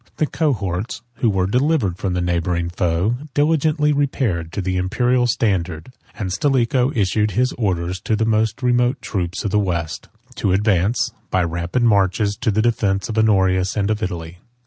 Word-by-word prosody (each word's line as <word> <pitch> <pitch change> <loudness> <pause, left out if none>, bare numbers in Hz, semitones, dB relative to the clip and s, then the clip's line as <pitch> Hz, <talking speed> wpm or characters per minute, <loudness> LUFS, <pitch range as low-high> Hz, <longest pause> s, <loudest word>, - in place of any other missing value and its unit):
The 155 - +2
cohorts, 110 - -2
who 120 - +2
were 95 -3 +1
delivered 125 - +1
from 95 -2 -1
the 90 - 0
neighboring 85 0 -1
foe, 90 +7 0 0.2
diligently 150 0 +2
repaired 120 - -1
to - - -3
the 95 -1 -1
Imperial 125 +7 +1
standard; 95 -5 -1 0.3
and 95 -5 -3
Stilicho 130 +2 +1
issued 105 0 +1
his 125 +1 +2
orders 90 -5 -2
to 110 - +1
the 110 +1 0
most 110 +2 0
remote 125 +1 +2
troops 90 0 -3
of 100 - -1
the 105 - +3
West, 85 -5 -3 0.3
to 95 - +1
advance, 100 +2 +1 0.2
by 95 -1 +1
rapid 85 +8 -1
marches, 100 -1 +2
to 125 - -1
the 110 +1 +1
defence 100 -4 0
of 110 - -4
Honorius 95 -3 +2
and 105 0 +1
of 105 0 -2
Italy. 85 -3 -5
105 Hz, 170 wpm, -20 LUFS, 90-120 Hz, 0.3 s, the